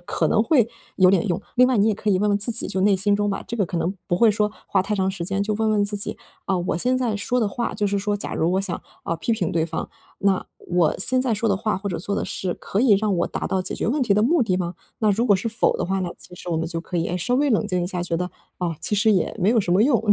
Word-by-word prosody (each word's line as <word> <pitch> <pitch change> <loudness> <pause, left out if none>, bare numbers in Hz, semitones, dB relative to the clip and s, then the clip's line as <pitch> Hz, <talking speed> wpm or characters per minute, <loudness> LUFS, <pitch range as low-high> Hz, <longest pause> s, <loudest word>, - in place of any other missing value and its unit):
可 170 -2 -1
能 215 - +3
会 235 -2 +3 0.3
有 185 -1 +6
点 195 +1 +2
用， 175 0 0 0.2
另 250 +1 +6
外 255 -3 +2
你 205 +2 +4
也 215 - +2
可 210 +1 -1
以 185 - +3
问 210 +2 +1
问 205 0 +2
自 210 +4 -1
己， 230 - -2
就 190 - -2
内 200 0 +4
心 200 +1 +2
中 205 0 0
吧， 195 - -3
这 235 - -3
个 205 - +2
可 170 - -3
能 175 +3 -1
不 - - 0
会 230 +3 +5
说 210 0 +1 0.2
花 - - +2
太 210 +2 -2
长 190 -1 +1
时 180 -3 -5
间 195 +2 -1
就 210 +1 -1
问 220 +1 +1
问 210 -1 +2
自 205 0 -2
己， 200 - -4 0.3
啊， 195 - 0
我 175 -2 -1
现 250 +9 +1
在 235 -4 0
说 245 +4 0
的 215 - +1
话 235 +4 -3
就 205 - 0
是 200 0 0
说 205 +1 -1
假 205 - -5
如 165 +2 +1
我 190 - +2
想， 185 -3 -3 0.2
啊， 165 - -1
批 165 +8 -1
评 185 -7 -1
对 165 -1 +1
方， 165 - -4 0.3
那 195 -1 +1
我 175 -3 +1
现 255 +6 +2
在 250 - 0
说 220 +1 0
的 200 - +2
话 215 +2 -1
或 200 +1 -4
者 175 - -3
做 200 +4 -3
的 - - -1
事 185 -2 -3
可 200 - -3
以 260 - +4
让 210 -2 +1
我 170 - +1
达 - - -4
到 190 -1 0
解 - - -2
决 - - -2
问 275 +4 +1
题 220 -5 +2
的 210 +1 +3
目 300 +4 +3
的 190 -5 +1
吗？ 175 -1 -3 0.2
那 215 -2 +3
如 225 +4 +1
果 205 - +5
是 200 +4 -1
否 225 0 +1
的 - - 0
话 195 +1 -1
呢， 180 -2 -2
其 180 - -13
实 175 - -7
我 165 - 0
们 165 - -2
就 165 0 -3
可 175 - -5
以， 165 - 0
诶， 180 - -2
稍 195 +8 0
微 290 +1 +2
冷 220 -3 +2
静 180 -3 0
一 175 - -1
下， 180 -2 -3
觉 175 -1 -2
得， 180 +1 -3 0.3
啊， 170 -3 -2
其 - - +1
实 220 +2 +3
也 185 -5 +1
没 185 - +3
有 230 - +4
什 175 -2 -1
么 195 - +5
用， 250 -1 +4
200 Hz, 345 characters per minute, -23 LUFS, 180-220 Hz, 0.3 s, 有